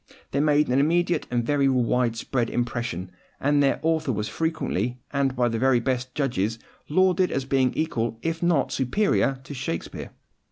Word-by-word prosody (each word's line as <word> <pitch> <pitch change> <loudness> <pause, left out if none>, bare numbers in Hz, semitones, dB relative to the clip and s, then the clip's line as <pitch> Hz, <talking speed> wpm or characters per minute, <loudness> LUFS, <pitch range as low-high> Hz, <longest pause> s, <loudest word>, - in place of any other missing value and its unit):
They 140 - 0
made 150 0 +3
an 125 +2 +2
immediate 170 +3 +1
and 120 -1 0
very 140 +1 +2
widespread 125 -1 0
impression; 120 -7 -3 0.3
and 145 +1 +2
their 140 - +2
author 160 -4 +1
was 105 -2 -2
frequently, 125 - -2 0.2
and 140 -2 +1
by 120 -1 +2
the 115 -1 -1
very 130 0 +4
best 130 +1 -2
judges, 120 -6 0 0.3
lauded 185 +3 +3
as 135 -1 -1
being 130 -1 +2
equal, 120 -8 -1
if 165 0 -2
not 170 -6 +2
superior, 135 - +1
to 140 - -8
Shakespeare. 125 -11 -5
130 Hz, 160 wpm, -25 LUFS, 120-150 Hz, 0.3 s, very